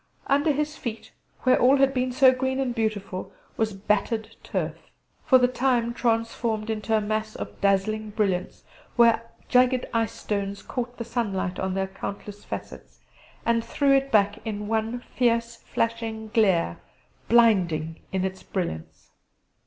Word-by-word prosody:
Under 285 +3 +3
his 300 +2 -2
feet, 225 -2 -6 0.3
where 255 - +4
all 265 +3 +6
had 270 0 +3
been 255 -1 0
so 260 +1 +6
green 260 +1 -1
and 260 -3 0
beautiful, 210 -5 -3 0.2
was 220 -1 0
battered 215 +3 -1
turf, - - -4 0.4
for 260 -4 +8
the 250 -1 +4
time 245 -2 +1
transformed 230 -2 -1
into 220 0 0
a - - 0
mass 215 +1 -2
of - - -7
dazzling 205 +2 +1
brilliants, 200 -4 -1 0.3
where 230 -1 +4 0.2
jagged 250 0 +3
ice 230 -1 +1
stones 200 -1 -3
caught 245 -1 -4
the 235 - -5
sunlight 200 -6 -2
on 190 0 -1
their 195 0 0
countless 200 +1 -7
facets, - - -8 0.4
and 230 0 +2
threw 275 +4 +2
it 275 0 +1
back 205 0 +3
in 210 -1 -4
one 225 +2 -1
fierce 235 -1 +1
flashing 225 -1 -3
glare, 190 - +2 0.5
blinding 175 -9 +3
in 190 0 0
its 190 0 -4
brilliance. 170 - -5
225 Hz, 145 wpm, -25 LUFS, 205-245 Hz, 0.5 s, for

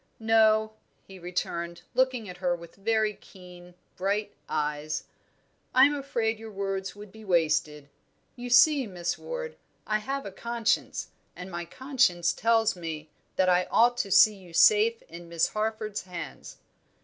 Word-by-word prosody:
"No," 220 -1 +4 0.3
he 190 -1 -12
returned, 170 -1 -4
looking 255 -3 +1
at 180 -1 -9
her 180 -1 0
with 170 -1 -12
very 215 +1 +1
keen, 180 -2 -15 0.2
bright 200 +3 -1 0.2
eyes. 150 +1 -2 0.7
"I 260 +1 +8
am 290 - +2
afraid 235 -6 -2
your 225 0 -9
words 195 -1 -3
would 205 -1 -11
be 220 +1 -13
wasted. 155 -5 +1 0.5
You 245 0 -7
see, 270 +1 +5
Miss 175 -3 -3
Ward, - - -6 0.3
I 215 0 0
have 275 +4 -4
a 200 - -6
conscience, 235 +3 -1 0.3
and 180 +1 -8
my 170 0 -4
conscience 240 - +1
tells 225 -1 +2
me 160 -3 -7 0.2
that 185 - +2
I 180 0 +3
ought 240 +1 +4
to 200 - -1
see 210 +3 +7
you 185 -4 -15
safe 215 +6 +5
in 170 0 -12
Miss 170 -1 +1
Harford's 215 -1 -3
hands." 175 -2 -8
200 Hz, 150 wpm, -27 LUFS, 175-225 Hz, 0.7 s, I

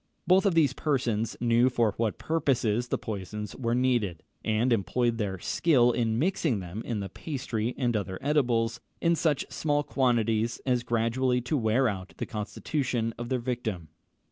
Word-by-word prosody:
Both 190 +2 +4
these 150 -5 +4
persons 120 -8 -1
knew 120 +1 +4
for 115 -4 +1
what 110 -2 -1
purposes 125 -7 0
the - - 0
poisons 105 0 -5
were 115 -2 -1
needed, 120 -9 +1 0.2
and 110 +3 +2
employed 115 +4 0
their 100 -3 -1
skill 125 - +3
in 115 -2 0
mixing 155 - +1
them 95 +4 -6
in 110 -4 -3
the 100 - -5
pastry 125 - -3
and 120 -3 0
other 95 -3 -2
edibles, 120 -6 +1 0.2
in 170 0 +3
such 150 -4 +1
small 145 -1 0
quantities 115 -5 +1
as 125 -2 +2
gradually 120 +2 +1
to 125 +6 -1
wear 120 +1 +2
out 95 -3 -4
the - - -3
constitution 115 +1 -2
of 120 0 -5
their 130 - +1
victim. 115 -9 -3
120 Hz, 160 wpm, -28 LUFS, 110-130 Hz, 0.2 s, Both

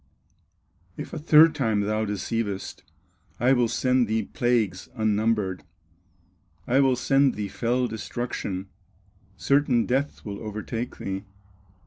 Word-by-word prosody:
If - - -7
a 165 - -4
third 155 +1 +6
time 110 -7 0
thou 110 +2 0
deceivest, 105 0 -3 0.6
I 125 +3 +4
will 120 -2 +3
send 125 +1 +1
thee 110 +1 0
plagues, 110 -5 -1
unnumbered, 110 -3 0 1.0
I 130 +3 +2
will 135 -2 +4
send 135 +1 +2
thee 105 -1 -3
fell 120 +5 0
destruction, 110 -4 -4 0.7
Certain 140 -4 +2
death 135 +3 -1
will 100 -1 -5
overtake 110 +2 -5
thee." 95 +1 -5
115 Hz, 115 wpm, -25 LUFS, 105-130 Hz, 1.0 s, third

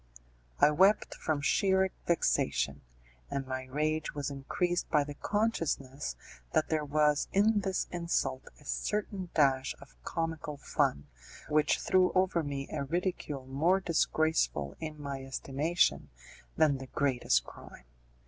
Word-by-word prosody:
I - - +6
wept 190 +7 +4
from 155 -3 -2
sheer 190 +3 +2 0.2
vexation; 70 - +1 0.5
and 140 -1 -2
my 130 0 -4
rage 155 +4 -1
was 145 -1 -3
increased 175 +6 -1
by 150 -2 +3
the 145 0 -7
consciousness 155 - -1 0.4
that 155 -1 +2
there 155 -1 +1
was 150 0 +2
in 205 +2 +4
this 190 -1 -1
insult 170 -7 -1
a 145 - -19
certain 200 +1 -2
dash 135 -3 +3
of - - -15
comical 165 - -3
fun 70 - 0 0.4
which 150 0 +3
threw 185 -1 +3
over 185 -2 +2
me 140 -2 -4
a 145 -2 -2
ridicule 155 -3 -2
more 160 +9 +2
disgraceful 160 - +1
in 155 -1 -6
my 140 -2 -5
estimation 140 +5 0 0.5
than 150 -4 +3
the 130 - -8
greatest 125 - +1
crime. - - -13
150 Hz, 130 wpm, -31 LUFS, 135-175 Hz, 0.5 s, I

